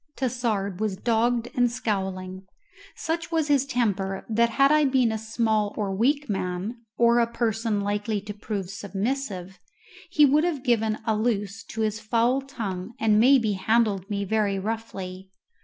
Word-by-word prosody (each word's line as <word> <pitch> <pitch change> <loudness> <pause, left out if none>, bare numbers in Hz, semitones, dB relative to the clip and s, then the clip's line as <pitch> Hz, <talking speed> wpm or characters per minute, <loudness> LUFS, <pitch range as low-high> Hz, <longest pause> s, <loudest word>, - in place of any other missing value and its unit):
Tassard 225 -7 -1
was 210 -3 -1
dogged 235 +2 +1
and 245 -1 +2
scowling. 190 -4 -3 0.5
Such 330 +1 -3
was 320 -2 0
his 280 -2 +3
temper 200 -7 -1
that 230 +1 +3
had 275 +5 +4
I 305 -1 +5
been 260 -4 +3
a 220 - -1
small 220 -2 0
or 200 -3 -1
weak 280 +8 +1
man, 190 +2 -3 0.2
or 235 0 +5
a 235 - +3
person 225 -2 0
likely 205 +1 -1
to 205 +1 -7
prove 205 -2 -5
submissive, 200 -1 -4 0.5
he 305 -4 +5
would 295 +3 +4
have 320 -7 -1
given 225 -3 +1
a 220 -2 +1
loose 210 -1 -1
to 225 - -5
his 215 0 0
foul 235 +4 +1
tongue 220 -6 -5
and 215 -1 +3
maybe 240 -2 +5
handled 200 0 +1
me 200 -1 -2
very 205 -1 +1
roughly. 190 -3 -5
220 Hz, 155 wpm, -25 LUFS, 200-240 Hz, 0.5 s, I